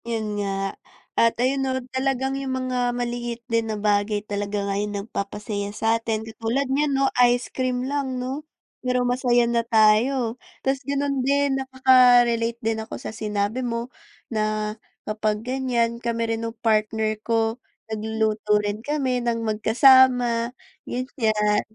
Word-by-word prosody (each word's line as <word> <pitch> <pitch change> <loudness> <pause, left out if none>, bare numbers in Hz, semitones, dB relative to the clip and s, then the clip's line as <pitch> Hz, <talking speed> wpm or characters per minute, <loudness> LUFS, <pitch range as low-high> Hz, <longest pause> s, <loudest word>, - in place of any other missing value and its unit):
Yun 215 -3 -2
nga. 195 -1 -2 0.4
At 230 0 +3
ayun 260 +3 +1
no 260 -1 0 0.2
talagang 265 0 0
yung 265 -1 -2
mga 250 -1 -1
maliit 240 -1 -3
din 230 -1 0
na 215 - -2
bagay 205 0 0
talaga 205 0 -3
nga 200 - -1
yung 210 0 -3
nagpapasaya 205 0 -4
sa'tin. 225 0 0
Katulad 230 +5 -2
niyan 285 0 +1
no 275 - +3 0.2
ice 245 0 +3
cream 255 -1 -1
lang 270 -2 -2
no? 260 +3 -3 0.4
Pero 250 -1 0
masaya 245 -1 +2
na 235 0 +1
tayo. 230 +2 +3 0.2
Tas 270 0 +1
ganun 280 0 -1
din 275 0 +1
nakaka-relate 245 -3 +4
din 225 0 0
ako 220 - -7
sa - - -7
sinabi 210 +2 -2
mo 235 0 -3 0.4
na 215 -1 -1 0.3
kapag 215 0 -2
ganyan, 240 -2 0
kami 230 -1 -1
rin 225 - -3
nung 230 0 -5
partner 220 0 +1
ko 225 +1 0 0.3
nagluluto 220 -1 0
rin 205 0 -2
kami 265 -2 -1
ng 235 -1 -1
magkasama 240 +2 +4 0.4
ganyan. 220 -5 0
235 Hz, 140 wpm, -24 LUFS, 215-255 Hz, 0.4 s, nakaka-relate